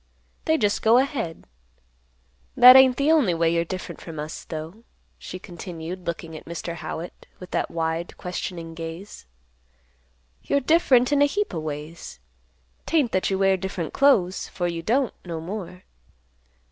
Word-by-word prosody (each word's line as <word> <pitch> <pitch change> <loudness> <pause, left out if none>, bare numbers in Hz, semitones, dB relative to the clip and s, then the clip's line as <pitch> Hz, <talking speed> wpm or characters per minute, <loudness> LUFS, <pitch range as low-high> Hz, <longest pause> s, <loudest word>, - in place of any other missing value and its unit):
They 315 -1 +3
just 205 -5 +1
go 225 +2 +5
ahead. 250 - -1 1.1
That 250 +1 +10
ain't 265 -1 +7
the 285 +3 +3
only 260 - +3
way 165 0 +2
you're 170 0 +2
different 185 +2 -7
from 165 -2 -9
us, 150 +1 -6
though," 160 +8 -7 0.4
she 185 - -7
continued, 175 -1 -8
looking 165 -1 -5
at - - -10
Mr. 170 0 -5
Howitt, 160 +1 -7
with 180 - -11
that - - -1
wide 165 +1 -3
questioning 175 -2 -5
gaze. 165 - -8 1.1
"You're 280 - +1
different 270 -3 +3
in 285 -1 +3
a - - +7
heap 410 +8 -1
o' 165 - -2
ways. 155 - -7 0.7
'Tain't 295 -8 +2
that 185 - +1
you 190 - 0
wear 195 0 +3
different 185 -3 -4
clothes, 205 -10 +3
for 175 - -4
you 170 -1 -3
don't, 245 +7 +1
no 170 -3 -5
more. 180 +1 -7
180 Hz, 155 wpm, -24 LUFS, 165-245 Hz, 1.1 s, That